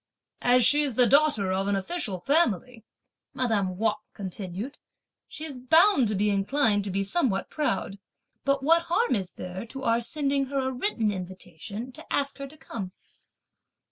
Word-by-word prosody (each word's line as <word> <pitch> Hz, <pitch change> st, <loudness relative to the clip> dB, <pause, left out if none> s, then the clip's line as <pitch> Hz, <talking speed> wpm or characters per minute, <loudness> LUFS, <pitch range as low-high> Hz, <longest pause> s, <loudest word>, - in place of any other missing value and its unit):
"As 245 Hz, 0 st, +4 dB
she's 290 Hz, -4 st, +3 dB
the 250 Hz, -, +6 dB
daughter 270 Hz, -7 st, +4 dB
of 190 Hz, +1 st, 0 dB
an 200 Hz, -, +1 dB
official 195 Hz, -, -1 dB
family," 250 Hz, -, +1 dB, 0.5 s
madame 205 Hz, -7 st, 0 dB
Wang 220 Hz, +1 st, +2 dB, 0.2 s
continued, 195 Hz, +5 st, -6 dB, 0.5 s
"she's 305 Hz, -4 st, -7 dB
bound 320 Hz, -, +4 dB
to 210 Hz, -, -1 dB
be 205 Hz, +2 st, +1 dB
inclined 205 Hz, +1 st, +1 dB
to -, -, -3 dB
be 195 Hz, +1 st, -1 dB
somewhat 200 Hz, -, 0 dB
proud; 230 Hz, -9 st, -2 dB, 0.4 s
but 275 Hz, -1 st, +1 dB
what 335 Hz, +3 st, +4 dB
harm 450 Hz, +8 st, +2 dB
is 190 Hz, -5 st, -2 dB
there 180 Hz, +2 st, -6 dB
to 270 Hz, +3 st, -7 dB
our 230 Hz, -1 st, +2 dB
sending 275 Hz, +2 st, 0 dB
her 275 Hz, +1 st, -3 dB
a 260 Hz, -1 st, 0 dB
written 245 Hz, -, 0 dB
invitation 190 Hz, +4 st, -7 dB
to -, -, -13 dB
ask 280 Hz, 0 st, -1 dB
her 275 Hz, -, -5 dB
to 305 Hz, +3 st, -14 dB
come!" 195 Hz, -9 st, -7 dB
235 Hz, 160 wpm, -27 LUFS, 195-280 Hz, 0.5 s, the